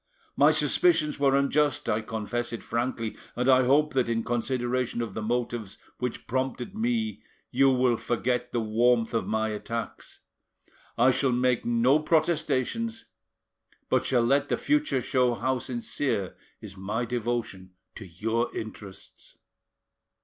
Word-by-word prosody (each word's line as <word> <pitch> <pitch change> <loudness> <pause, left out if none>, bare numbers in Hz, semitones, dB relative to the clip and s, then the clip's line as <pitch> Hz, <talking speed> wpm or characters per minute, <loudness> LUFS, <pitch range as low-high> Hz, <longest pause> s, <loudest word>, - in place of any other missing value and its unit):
My - - +6
suspicions 155 - +3
were 135 -1 +3
unjust, 145 +1 +1
I 110 -1 +1
confess 115 +2 -3
it 115 - -6
frankly, 115 -1 -2 0.2
and 125 +1 -1
I 130 -1 +5
hope 150 +4 +3
that 130 -3 +1
in 115 -1 0
consideration 120 +1 -1
of 115 -4 -3
the 110 - -4
motives 115 -2 -2 0.2
which 125 -1 -4
prompted 130 - -3
me 225 0 -1 0.3
you 135 +2 +4
will 125 -2 +2
forget 125 +1 -1
the 120 - 0
warmth 115 +2 +2
of 115 - -1
my 110 0 0
attacks. 115 +2 -6 0.8
I 130 - +5
shall 130 +1 +1
make 125 0 +1
no 120 +5 +3
protestations, 165 - 0 0.8
but - - +2
shall 125 -3 +3
let 140 +4 +2
the - - +1
future 295 - +1
show 125 -1 +1
how 130 +1 -1
sincere 120 -4 -3 0.3
is 100 -3 -9
my 105 +5 -3
devotion 115 -6 -3 0.2
to 110 - -9
your 110 +7 -1
interests." 105 -3 -9
125 Hz, 140 wpm, -27 LUFS, 115-135 Hz, 0.8 s, My